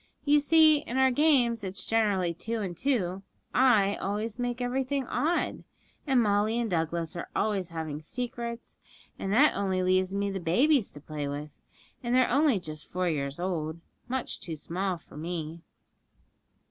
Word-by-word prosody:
You 295 0 +5
see, 310 +1 +6
in 260 -3 -5
our 265 0 +5
games 245 -6 +3
it's 190 0 -4
generally 200 -6 +1
two 225 +7 -4
and 185 -4 -4
two; 195 - -1 0.3
I 215 -6 +4
always 210 +4 -3
make 245 0 -2
everything 260 +2 -1
odd, 325 +8 -1 0.4
and 260 -4 +4
Molly 210 +2 +2
and 240 -1 0
Douglas 165 0 -1
are 170 - -5
always 195 -5 0
having 160 -3 -5
secrets, 235 +4 -5 0.4
and 195 - -3
that 275 +9 +5
only 190 -2 0
leaves 185 +1 +2
me 200 0 0
the 195 - -3
babies 235 - +3
to 145 - -10
play 150 -1 -5
with, 145 +1 -5 0.5
and 240 -1 0
they're 255 -1 +4
only 285 -7 +3
just 155 -3 -6
four 180 0 0
years 140 -1 -2
old 165 -3 -2 0.3
much 260 0 -3
too 165 -3 -6
small 180 +4 -3
for 160 - -15
me.' 165 0 -5
200 Hz, 160 wpm, -28 LUFS, 170-245 Hz, 0.5 s, see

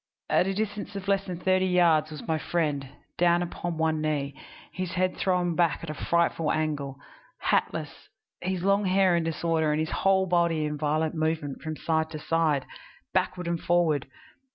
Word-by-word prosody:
At 185 - +4
a 195 - 0
distance 210 0 -3
of 195 0 -6
less 195 0 +2
than 180 -3 -5
thirty 185 0 +2
yards 170 -4 +4
was 155 -1 -8
my 160 -1 +1
friend, 150 -6 -1 0.3
down 175 0 +4
upon 175 -1 -4
one 160 -1 +1
knee, 145 -2 -1 0.4
his 185 -2 -4
head 185 0 +1
thrown 180 -2 +1
back 170 -3 +1
at 160 - -4
a - - -4
frightful 170 -1 +1
angle, 145 -3 -2 0.5
hatless, - - -1 0.3
his 185 0 -2
long 200 +1 +3
hair 190 -1 +4
in 170 - +1
disorder 160 -1 0
and 150 - +1
his 155 0 -1
whole 190 -1 +3
body 170 -3 +2
in 150 0 -2
violent 155 +1 0
movement 155 -3 -2
from 155 -1 -4
side 160 -1 0
to 155 - -6
side, 155 -4 +1 0.5
backward 180 -1 0
and 170 -1 -1
forward. 165 -6 +2
165 Hz, 175 wpm, -27 LUFS, 155-180 Hz, 0.5 s, At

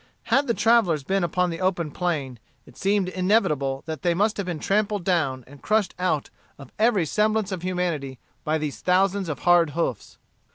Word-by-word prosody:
Had 280 +1 +3
the 235 - +1
travellers 215 -10 +3
been 195 +5 0
upon 180 +1 0
the 165 - -6
open 175 -4 0
plain, 145 -9 -3 0.3
it - - -17
seemed 200 -1 +1
inevitable 180 -9 +1
that 160 -1 -5
they 175 -3 +1
must 210 +4 +1
have 200 -3 -3
been 175 -3 -3
trampled 205 +3 0
down 155 -8 0
and 140 +1 -15
crushed 215 -3 +1
out 180 -5 -1 0.3
of 140 -2 -13
every 215 -6 +3
semblance 215 +3 0
of 185 -3 -4
humanity 175 -7 -2 0.3
by 155 +1 0
these 150 -2 -5
thousands 190 0 +1
of 150 - -4
hard 175 -2 +4
hoofs. 130 -10 -3
180 Hz, 180 wpm, -24 LUFS, 155-200 Hz, 0.3 s, hard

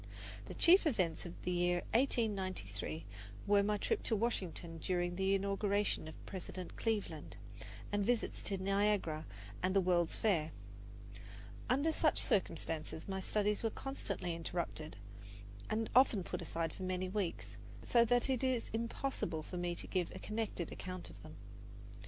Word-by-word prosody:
The - - -7
chief 360 0 +6
events 185 - 0
of 175 - -9
the 180 - 0
year 175 0 +2
1893 185 - 0 0.4
were 205 0 +5
my 210 +1 +1
trip 430 - 0
to 225 - +2
Washington 185 -7 -2
during 175 0 0
the 190 +1 +3
inauguration 200 -2 +1
of 155 - -10
President 185 -1 -6
Cleveland, 220 -3 -2 0.5
and 205 0 +1
visits 235 +2 0
to 195 - -1
Niagara 195 -5 +1 0.3
and 185 +1 +1
the - - +7
World's 175 -2 +2
Fair. 165 -8 +2 1.2
Under 280 +6 +3
such 310 0 +2
circumstances 165 -4 0
my 190 -1 -2
studies 210 +2 +1
were 225 - +1
constantly 205 -9 -3
interrupted 165 -3 -4 0.7
and 220 +1 0
often 245 -7 +6
put - - -4
aside 165 0 -2
for - - -10
many 185 0 -1
weeks, 190 -2 -3 0.3
so 235 -1 +5
that 245 +1 +3
it 265 -2 +1
is 255 -3 +1
impossible 230 - -2
for 180 - -6
me 175 0 -1
to - - -4
give 180 -3 0
a - - -4
connected 210 -4 -3
account 185 -1 -6
of - - -14
them. - - -11
195 Hz, 150 wpm, -36 LUFS, 175-220 Hz, 1.2 s, the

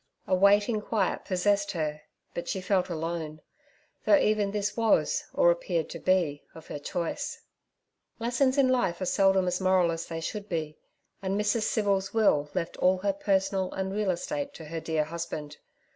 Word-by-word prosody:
A - - -1
waiting 205 +3 +4
quiet 215 0 -1
possessed 200 +2 +1
her, 155 -3 -2 0.3
but 170 0 -5
she 190 - -1
felt 185 0 +1
alone, 160 -2 -4 0.6
though 305 - +6
even 210 -5 +2
this 205 0 -2
was, 230 - +2
or - - +4
appeared - - -1
to - - -6
be, 175 -6 +1
of 160 - -11
her 145 - -5
choice. 170 +3 -3 0.8
Lessons 255 +3 +1
in 275 -2 +5
life 245 -9 +1
are 185 - -2
seldom 195 0 +3
as 180 +1 -1
moral 185 -2 +3
as 165 0 -4
they 165 -1 -4
should 205 +5 -5
be, 155 -3 -3 0.4
and 195 +1 -1
Mrs. 210 +1 +1
Civil's 200 -1 0
will 150 -10 +3
left 170 -2 -2
all 185 +1 +3
her 200 +1 0
personal 195 -1 0
and 190 0 -3
real 210 -1 0
estate 285 - -3
to 160 - -9
her 165 +2 -4
dear 160 -1 0
husband. 155 -2 -6
190 Hz, 175 wpm, -28 LUFS, 170-210 Hz, 0.8 s, though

